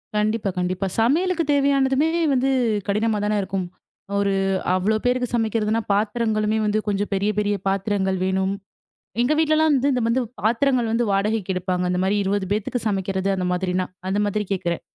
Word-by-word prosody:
கண்டிப்பா, 210 0 0
கண்டிப்பா. 180 +2 -1
சமையலுக்கு 335 +9 +2
தேவையானதுமே 275 +1 +2 0.2
வந்து 265 +1 +2 0.4
கடினமா 215 +2 +1
தான 210 0 +1
இருக்கும். 190 -1 -3 0.5
ஒரு 200 -1 +1 0.4
அவ்ளோ 205 +4 +1
பேருக்கு 250 0 +1
சமைக்கிறதுனா 225 -1 0
பாத்திரங்களுமே 215 0 0
வந்து 210 +1 +1
கொஞ்சம் 205 0 -1
பெரிய, 195 +2 +1
பெரிய 205 0 +1
பாத்திரங்கள் 195 -1 0
வேணும். 190 +1 0 0.7
எங்க 250 +5 +2
வீட்லலாம் 315 0 +3 0.2
வந்து 255 -3 +1
வந்து 240 +3 +2 0.2
பாத்திரங்கள் 240 +1 +2
வந்து 235 +1 +1
வாடகைக்கு 200 0 0
எடுப்பாங்க. 180 0 -1
அந்தமாரி 190 +3 +1
20 195 0 -1
பேத்துக்கு 215 +3 -2
சமைக்கிறது 195 -1 -1
அந்த 180 -1 -2
மாதிரினா. 180 0 -1 0.2
அந்த 200 +2 0
மாதிரி 210 +1 -1
கேட்கிறேன். 175 -3 -2
210 Hz, 145 wpm, -22 LUFS, 195-235 Hz, 0.7 s, வீட்லலாம்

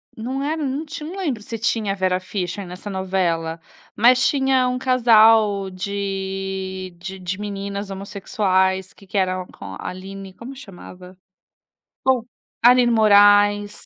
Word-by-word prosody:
Não 260 +5 -4
era 310 +2 -2
não 280 +3 -2
ti 320 +1 -8
não 340 +6 -7
lembro 290 - -2
se 230 +2 -6
tinha 220 -2 0
a - - -5
Vera 185 -1 0
Fischer 185 0 -5
nessa 180 +3 -9
novela, 180 -4 -1 0.4
mas 250 +3 +5
tinha 265 -2 +2
um 250 - -2
casal 225 -6 +4
de 190 -1 -4
de 190 +2 -7
de 185 +1 -5
meninas 200 0 -5
homossexuais 190 -1 -1
que 195 - -19
que 200 - -4
era 185 -1 0
com - - -10
a - - -7
Aline, 190 +1 -9
como 250 +7 -10
chamava? 185 -6 -12 0.9
Ou 260 -3 +2 0.4
Alinne 245 0 +6
Moraes. 205 -1 +4
200 Hz, 145 wpm, -21 LUFS, 190-235 Hz, 0.9 s, Alinne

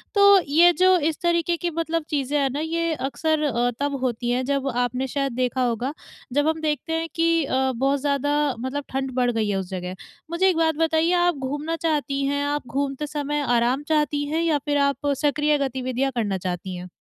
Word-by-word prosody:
तो 400 -1 +7
ये 335 +5 +6
जो 370 0 +6
इस 310 - -14
तरीकें 340 0 +1
की 350 - 0
मतलब 330 0 -2
चीज़ें 290 0 0
हैं 275 -1 +2
ना, 280 - -4
ये 330 +1 -1
अक्सर 305 +2 -1
अ, 245 -3 +1
तब 285 0 -1
होती 240 -1 -1
है 255 +1 0
जब 275 0 -1
आपने 250 +2 -1
शायद 275 0 -2
देखा 255 +1 -1
होगा, 245 +4 -1 0.4
जब 290 +2 +2
हम 320 0 0
देखते 310 +1 -2
हैं 325 0 -1
कि 330 -1 +2
अ, 265 0 +1
बहुत 275 +3 +1
ज़्यादा 290 0 +1
मतलब 260 +4 -3
ठंड 270 0 -2
बढ़ 245 -1 +2
गई 220 -2 -1
है 195 - 0
उस 185 -1 -6
जगह। 185 -1 -5 0.4
मुझे 375 +3 +3
एक 350 - 0
बात 320 -1 +2
बताइए 325 +2 +2
आप 350 -1 +3
घूमना 290 +5 -3
चाहती 295 -4 -1
हैं, 285 +1 0
आप 290 -2 -2
घूमते 275 +3 -2
समय 295 0 -2
आराम 245 +4 +1
चाहती 295 -1 +1
हैं? 290 - -6
या 325 -1 +2
फिर 290 -1 +1
आप 280 0 +1
सक्रिय 295 +1 +2
गतिविधियाँ 265 -1 -1
करना 205 -5 0
चाहती 180 +1 -4
हैं? 180 0 -7
285 Hz, 205 wpm, -23 LUFS, 260-320 Hz, 0.4 s, तो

